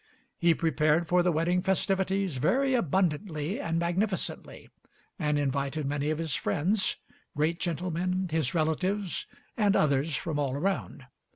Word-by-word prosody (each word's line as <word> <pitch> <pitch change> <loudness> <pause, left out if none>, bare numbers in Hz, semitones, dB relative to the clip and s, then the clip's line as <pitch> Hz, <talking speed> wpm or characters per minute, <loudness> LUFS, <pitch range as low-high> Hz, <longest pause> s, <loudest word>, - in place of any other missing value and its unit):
He 170 -1 +4
prepared 160 0 +2
for 180 +2 +4
the 180 0 +2
wedding 170 +3 +1
festivities 190 -2 0
very 265 - +2
abundantly 175 - 0
and 165 0 -1
magnificently, 180 +4 -2 0.5
and 150 -3 +1
invited 140 +1 -1
many 145 +1 -1
of 155 - 0
his 160 -3 -3
friends, 185 - 0 0.4
great 160 +3 +1
gentlemen, 180 +2 -1
his 160 -2 0
relatives 180 +5 -1 0.3
and 205 -3 +3
others 145 +1 +2
from 155 -1 -2
all 140 -3 0
around. 175 -4 -2
165 Hz, 130 wpm, -28 LUFS, 150-185 Hz, 0.5 s, He